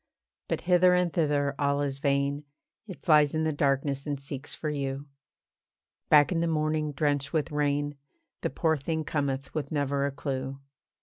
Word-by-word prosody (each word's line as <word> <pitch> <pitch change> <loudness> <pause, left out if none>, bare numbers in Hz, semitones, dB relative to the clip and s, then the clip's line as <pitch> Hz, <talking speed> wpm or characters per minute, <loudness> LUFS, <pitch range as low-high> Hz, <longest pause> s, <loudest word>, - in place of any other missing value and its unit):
But - - -2
hither 180 0 +5
and 180 -2 +1
thither 145 -3 +1
all 140 0 +1
is 140 -1 -3
vain, 140 +1 0 0.4
It 190 - -10
flies 150 -2 +5
in 155 - +1
the 160 - +1
darkness, 140 0 0
and 145 -2 -2
seeks 140 0 -6
for 155 - -3
you. 140 -1 -3 1.0
Back 150 +1 +6
in 170 - +1
the 170 - +1
morning, 155 -1 0
drenched 145 0 0
with 160 0 0
rain, 145 0 0 0.5
The - - 0
poor 160 +3 +1
thing 160 +3 -2
cometh 140 -3 -2
with 145 -3 -3
never 140 -2 0
a - - -3
clue. 135 -1 -4
145 Hz, 170 wpm, -28 LUFS, 140-155 Hz, 1.0 s, Back